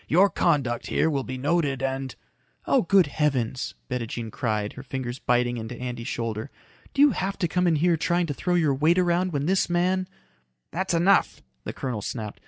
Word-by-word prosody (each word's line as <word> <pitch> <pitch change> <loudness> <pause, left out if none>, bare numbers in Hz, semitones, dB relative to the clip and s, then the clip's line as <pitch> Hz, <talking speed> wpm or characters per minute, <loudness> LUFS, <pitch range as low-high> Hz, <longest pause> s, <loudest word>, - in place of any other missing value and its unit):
Your 190 +5 +4
conduct 125 -8 +1
here 160 - +1
will 140 -2 -1
be 130 0 -5
noted 140 -1 0
and 135 -1 -2 0.3
" - - -40
"Oh, - - +3
good 190 +1 +4
heavens!" 135 -5 -1
Bettijean 115 -3 -4
cried, 105 -3 -2
her 135 - -9
fingers 130 -1 -5
biting 120 0 +1
into 115 +2 -6
Andy's 120 -1 -5
shoulder. 115 0 -3 0.5
"Do 280 - +5
you 295 - +6
have 195 -2 -2
to 180 - 0
come 180 +2 +1
in 165 - +3
here 170 +2 +2
trying 175 +2 +1
to 150 - -3
throw 180 +5 -1
your 155 -5 +3
weight 155 +6 +3
around 180 0 +2
when 145 -2 -1
this 185 +2 +1
man 180 +2 +1 0.3
" 60 -1 -47
"That's 190 0 -1
enough," 185 +4 +3 0.2
the - - -4
colonel 125 -5 -4
snapped. 105 -1 -5
140 Hz, 195 wpm, -25 LUFS, 120-175 Hz, 0.5 s, you